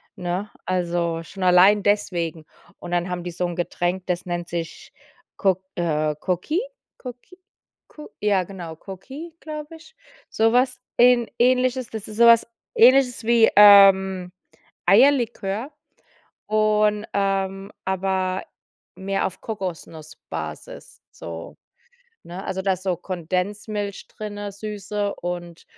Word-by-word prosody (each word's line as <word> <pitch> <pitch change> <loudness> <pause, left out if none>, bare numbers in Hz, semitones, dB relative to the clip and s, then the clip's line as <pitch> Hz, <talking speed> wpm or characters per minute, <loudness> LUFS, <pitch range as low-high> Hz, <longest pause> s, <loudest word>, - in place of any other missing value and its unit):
ne? 180 +3 -3 0.2
Also 170 -2 -1
schon 185 +3 -8
allein 185 +3 +5
deswegen. 170 -6 -1 0.3
Und 175 - -8
dann 175 0 0
haben 175 -1 -4
die 180 - -5
so 180 +1 -2
’n 175 -1 -4
Getränk, 175 +1 -2
das 180 -1 -2
nennt 175 -1 -4
sich 170 -1 -6 0.5
Coq 190 -1 +1
äh 155 -3 0
Coqui- 185 - -2 0.3
Coqui- 250 +8 -11 0.5
Co 300 - -11
ja 200 -3 +2
genau, 175 -3 -8
Coqui, 265 - -10
glaube 305 0 -8
ich. 335 +9 -17 0.3
So 225 +1 +2
was 255 +1 +2 0.2
Ähn 245 -1 +5
Ähnliches, 255 0 +2
das 220 -2 -7
ist 215 - -9
so 235 - +6
was 230 -1 +7 0.3
Ähnliches 250 0 +5
wie, 230 0 +5
ähm, 190 -3 +7 0.6
Eierlikör, 235 0 +3 0.8
und, 215 0 +2
ähm, 195 0 -1
aber 190 0 -1 0.5
mehr 195 +1 -2
auf 185 - -5
Kokosnussbasis, 180 - -7
so - - -9 0.7
ne? 180 +3 -8
Also 190 0 -3
da 195 0 +2
ist 185 - -5
so 185 -2 -1
Kondensmilch 195 +4 -4
drinne, 205 -1 -6
süße 205 0 -4
und 175 -1 -6
195 Hz, 125 wpm, -23 LUFS, 180-220 Hz, 0.8 s, was